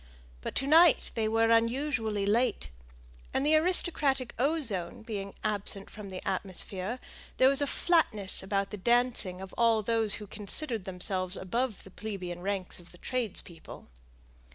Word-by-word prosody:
But - - -5
to 270 - 0
night 325 +3 +5
they 225 -2 0
were 225 +1 +2
unusually 230 -3 +1
late, 225 - +1 0.6
and 270 - +1
the 305 - +3
aristocratic 310 -6 +3
ozone 235 - 0
being 200 -3 -6
absent 205 -2 -1
from 210 -2 -9
the 185 -1 -7
atmosphere, 190 +3 -3 0.4
there 260 - +6
was 275 +1 +2
a 285 - +1
flatness 255 - +2
about 195 0 -1
the 210 - -5
dancing 235 -4 +1
of 190 -1 -9
all 230 -2 +3
those 225 -1 0
who 210 - -8
considered 215 +2 -3
themselves 185 0 -3
above 230 +3 -2
the 190 - -14
plebeian 185 -5 -6
ranks 190 -1 -3
of 175 - -15
the 175 - -12
tradespeople. 200 - -4
215 Hz, 150 wpm, -29 LUFS, 190-250 Hz, 0.6 s, there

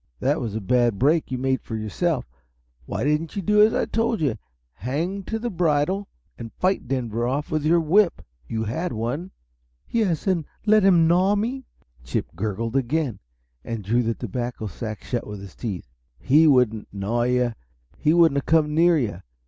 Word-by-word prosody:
"That 145 +3 +1
was 110 -4 -4
a 110 - -2
bad 120 +1 +2
break 150 - +2
you 130 - -2
made 130 +1 0
yourself. 120 - -1 0.6
Why - - -3
didn't 150 +3 0
you 200 - -3
do 210 +3 +4
as 215 +1 +6
I - - +1
told 230 -1 0
you 150 -4 +1 0.4
hang 160 - -3
to 225 - -2
the 240 +1 -3
bridle 175 +3 +1 0.3
and 115 -1 -7
fight 185 -5 0
Denver 120 -3 -1
off 140 +4 -2
with 155 -1 0
your 165 +3 +4
whip? 175 +4 +2 0.2
You 110 -1 -2
had 160 +11 -3
one." 125 +11 -3 0.6
"Yes 200 -9 0
and 185 -5 +1 0.2
let 215 0 +5
him 175 -4 +5
gnaw 185 +4 +3
me!" 240 +5 -2 0.4
Chip - - -3
gurgled 110 +5 -3
again, 135 -3 0 0.4
and 115 -3 -5
drew 115 +5 +2
the 115 -1 -1
tobacco 120 0 -4
sack 110 +2 -6
shut 120 -2 -3
with 105 -1 -7
his 95 -2 -10
teeth. 100 - -5 0.3
"He 150 - +4
wouldn't 125 -6 +3
'gnaw' 100 +4 -1
you 125 -1 +1 0.5
he 150 - +3
wouldn't 165 -4 +5
have - - -10
come 155 -2 +3
near 170 +1 +4
you. 105 - -2
140 Hz, 180 wpm, -24 LUFS, 115-170 Hz, 0.6 s, as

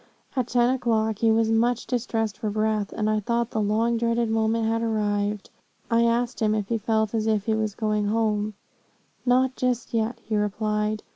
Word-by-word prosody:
At 255 -3 0
ten 245 +1 +3
o'clock, 220 -4 0
he 225 - +3
was 225 0 +3
much 235 +1 +1
distressed 225 -4 -2
for 220 -2 -2
breath, 215 -1 0
and 215 - -2
I 215 0 +2
thought 235 +2 -1
the 220 - -1
long 225 +3 +1
dreaded 230 0 0
moment 225 0 +1
had 225 +1 0
arrived. 210 -2 -1 0.4
I 230 0 +4
asked 235 +1 0
him, 215 -2 +2
if 205 -2 -2
he 230 -1 0
felt 220 0 0
as 220 -1 0
if 215 -2 +1
he 220 - +1
was 215 -2 -1
going 215 -1 0
home 215 -1 0 0.7
'not 255 +1 +3
just 250 -2 -1
yet,' 230 +1 0
he 220 - -1
replied. 210 +1 -1
220 Hz, 190 wpm, -25 LUFS, 215-235 Hz, 0.7 s, I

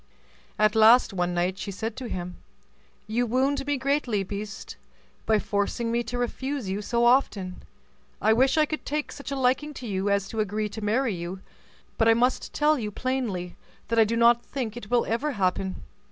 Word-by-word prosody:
At 215 0 +3
last, 225 +1 +6
one 175 -1 -1
night, 180 +2 0
she 200 - -5
said 220 +3 -4
to 255 -3 -5
him, 180 -2 -5 0.7
"You 235 +3 0
wound 265 +5 +1
me 290 -1 +1
greatly, 265 -6 0
beast, 205 +2 -6 0.5
by 220 - +4
forcing 210 +3 -1
me 235 +1 +1
to 245 +2 -4
refuse 260 0 -3
you 195 +2 -2
so 235 +3 +1
often; 210 -7 +2 0.6
I 220 - +4
wish 260 +6 +3
I 310 - +5
could 310 +1 -5
take 300 +1 -3
such 280 - -8
a 280 - -2
liking 270 +3 0
to 255 - -7
you 195 -2 -1
as 200 -1 +1
to 225 - -4
agree 210 0 -1
to 220 +2 -7
marry 225 +3 +1
you; 175 +2 -6 0.6
but 225 - +4
I 225 - +6
must 250 +3 +1
tell 300 -1 +2
you 215 -3 -3
plainly 210 -7 -3 0.3
that 230 0 +2
I - - +8
do 225 +2 -1
not 235 0 +5
think 240 -6 -4
it 240 -4 -8
will 245 -1 +2
ever 265 +7 -1
happen. 190 -2 -1
225 Hz, 195 wpm, -26 LUFS, 200-255 Hz, 0.7 s, I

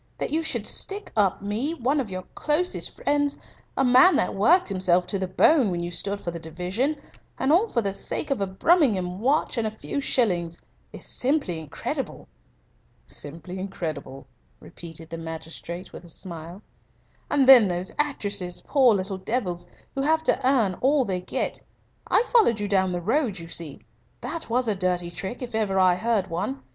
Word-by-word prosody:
That - - -3
you 320 +2 +1
should 250 -9 -1
stick 405 - -2
up 200 -2 +1
me, 230 +11 -2
one 275 +2 0
of 250 -6 -3
your 185 -1 -5
closest 315 +4 0
friends, 290 0 0 0.4
a 270 - +3
man 255 +9 +6
that - - +1
worked 335 - +4
himself 185 -2 +2
to 195 +2 -2
the 190 - -2
bone 245 - +4
when 175 -1 -2
you 175 - -4
stood 200 +3 -2
for 170 - -4
the 170 - -6
division 180 - -2 0.4
and 265 - +1
all 390 +8 +4
for 235 - 0
the 195 -1 -1
sake 285 +8 -2
of 270 - 0
a 195 - 0
Brummagem 190 - +2
watch 265 +1 +1
and 220 - 0
a 215 0 -7
few 280 - -4
shillings 175 -11 0 0.3
is - - -5
simply 255 - +1
incredible." 155 -3 -5 0.8
"Simply 170 +5 -2
incredible," 155 -8 -6 0.3
repeated 165 -1 -11
the 165 - -5
magistrate, 165 +2 -7
with - - -10
a 175 - -13
smile. 170 +2 -9 0.7
"And 275 -2 +3
then 250 -6 +9
those 180 +1 -1
actresses, 205 -11 -1
poor 260 -6 +4
little 190 0 -3
devils, 185 -5 -2 0.3
who 270 - -2
have 315 +3 +2
to - - +2
earn 240 -8 +2
all 275 0 +3
they 185 -3 -2
get. - - -2 0.5
I - - +4
followed 420 - +5
you 205 - -2
down 190 -2 +2
the 175 -1 -3
road, 225 - 0
you 165 -1 -8
see. 165 -4 -2 0.4
That 335 -6 -5
was 245 +1 +1
a 215 - +2
dirty 180 -2 -1
trick, 195 +8 -6
if 245 -1 -7
ever 210 -3 0
I 185 -1 +5
heard 215 +1 0
one. 135 -5 -4
200 Hz, 180 wpm, -25 LUFS, 175-265 Hz, 0.8 s, then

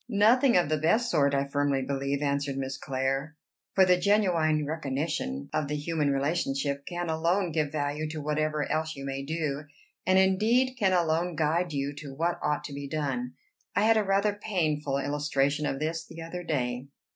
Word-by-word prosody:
"Nothing 235 +3 +5
of 175 - +3
the 155 0 0
best 220 +10 +2
sort, 140 -3 +3
I 140 0 +1
firmly 140 -1 0
believe," 140 +1 -2
answered 140 -1 -1
Miss 135 0 -3
Clare; 135 +3 -2 0.4
"for 190 - +6
the 180 -1 +5
genuine 175 -6 +2
recognition 140 - -3
of 150 - 0
the 150 - -2
human 150 0 0
relationship 140 -1 -1
can 175 0 -3
alone 170 +3 +1
give 155 -2 0
value 150 +1 -2
to 155 0 -5
whatever 150 0 -1
else 160 0 -1
you 140 0 -7
may 135 0 -3
do, 150 0 -3 0.4
and 185 0 +5
indeed 215 +7 +3
can 195 -4 +3
alone 170 0 +1
guide 160 +3 +1
you 140 0 -2
to 140 -2 -8
what 170 +4 0
ought 150 0 0
to 140 - -7
be 140 0 -5
done. 135 -4 -2 0.4
I 200 - +3
had 225 +1 +5
a 215 - +3
rather 200 +1 +2
painful 155 -9 -1
illustration 145 0 0
of 135 - -2
this 160 +3 -2
the 165 0 -9
other 180 +2 -6
day. 130 -6 -2
155 Hz, 180 wpm, -28 LUFS, 140-175 Hz, 0.4 s, for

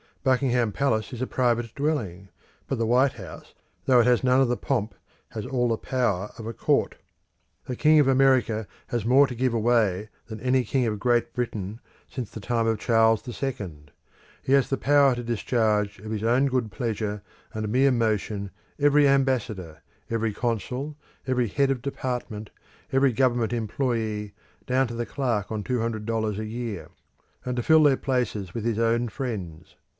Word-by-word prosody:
Buckingham 125 -4 +2
Palace 110 -2 0
is 120 - -6
a 130 - -1
private 120 -2 0
dwelling; 105 - -2 0.4
but 135 - -2
the 115 - 0
White 125 +3 +3
House, 95 -8 -11 0.3
though 125 -2 +5
it 120 - +4
has 125 0 +3
none 130 0 +4
of 135 - +3
the 125 - 0
pomp, 115 -6 -1 0.4
has 110 - -6
all 125 -2 +1
the 115 - +1
power 105 -7 -1
of 115 - -8
a 115 - -4
Court. - - +1 0.7
The 125 - -4
king 155 +4 +5
of 145 - +4
America 130 -5 +3 0.2
has 120 -3 -2
more 135 +4 +6
to 125 - -6
give 125 0 0
away 110 -3 +1 0.2
than 110 -1 -7
any 130 +2 +2
king 125 +2 0
of 105 -2 -2
Great 120 +2 +1
Britain 110 -4 -4 0.3
since 125 -6 -6
the - - -7
time 115 +2 0
of 110 -2 0
Charles 115 0 +3
the 120 - -7
Second. 90 - -5 0.5
He 135 - +1
has 140 -1 +4
the 135 - 0
power 140 -2 +4
to 120 - -5
discharge 110 -3 0
of 110 +2 -8
his 110 -1 -3
own 125 +5 +3
good 125 -5 -1
pleasure 105 0 -3 0.3
and 110 0 -3
mere 135 +4 +4
motion 110 -4 -1 0.3
every 145 0 +5
ambassador, 115 - 0 0.3
every 115 -2 -1
consul, 125 +6 -3 0.3
every 125 -2 +1
head 140 +6 +1
of 130 -3 -2
department, 125 -5 -4 0.4
every 135 0 +3
government 120 -2 +1
employé, 110 -3 -2 0.3
down 130 +1 +2
to 120 - -6
the 120 0 -2
clerk 115 -7 -2
on 110 -2 -3
two 125 +2 -1
hundred 110 -2 -3
dollars 110 -2 -1
a 110 - -3
year, 115 -3 -5 0.5
and 125 -1 -3
to 120 - -1
fill 160 +2 +6
their 140 -3 +5
places 120 -9 -2
with 115 -2 -3
his 115 -2 0
own 115 +1 +2
friends. 100 - -6
120 Hz, 180 wpm, -25 LUFS, 110-130 Hz, 0.7 s, more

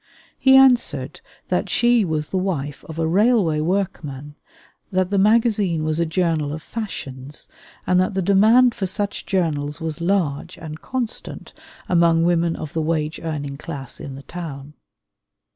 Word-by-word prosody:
He 265 0 +6
answered 265 -2 +3 0.3
that - - 0
she 240 -2 +3
was 155 -4 -2
the 190 - -1
wife 150 -7 -3
of 160 - -7
a 165 - 0
railway 190 -2 +3
workman, 155 -5 -2 0.6
that 185 0 0
the 200 - +2
magazine 210 -5 +2
was 155 +1 -1
a 170 - +1
journal 160 -4 0
of 155 +1 -7
fashions, 140 - -7 0.4
and 180 0 +3
that 185 +2 0
the 190 - +1
demand 220 +6 +5
for 195 - -3
such 200 +2 -3
journals 150 -6 -1
was 160 0 -4
large 170 -3 -1
and 155 -1 -8
constant 255 -3 -5 0.3
among 170 -2 +3
women 170 -1 +2
of 155 - -7
the 160 - 0
wage 155 -1 -1
earning 145 -4 -4
class 140 -4 -7
in 135 - -7
the 135 - -10
town. 150 -5 -8
170 Hz, 155 wpm, -21 LUFS, 150-195 Hz, 0.6 s, He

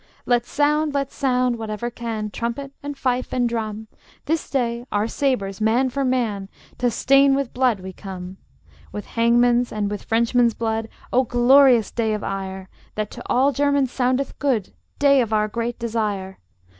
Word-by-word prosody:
Let 240 -1 +1
sound, 300 0 +1
let 275 -1 -1
sound, 250 -3 +1
whatever 220 +2 -4
can, 220 -3 -4
Trumpet 235 +6 -4
and 285 -1 -6
fife 255 -2 -1
and 245 -1 +1
drum, 220 -2 -4 0.4
This 320 +1 -1
day 240 -3 -1
our 205 +1 +1
sabres, 220 -7 -1
man 240 +4 +2
for 275 +2 -1
man, 230 -7 -1 0.3
To 245 - +2
stain 275 +3 +4
with 275 -3 -2
blood 245 -6 +1
we 190 0 -8
come; 185 -1 -8 0.5
With 210 - -6
hangman's 240 +1 +2
and 205 -1 -2
with 205 - -5
Frenchmen's 235 +1 +2
blood, 225 -1 -2 0.2
O 255 - +4
glorious 245 -1 +5
day 220 -2 0
of 210 - -5
ire, 190 -1 -5 0.3
That 215 -1 -3
to - - -9
all 265 +3 +3
Germans 280 -1 +1
soundeth 255 +2 -1
good 250 -9 0 0.2
Day 280 -2 +5
of 225 -2 -2
our 215 0 +2
great 235 +2 -3
desire! 210 -5 -3
235 Hz, 165 wpm, -22 LUFS, 215-260 Hz, 0.5 s, glorious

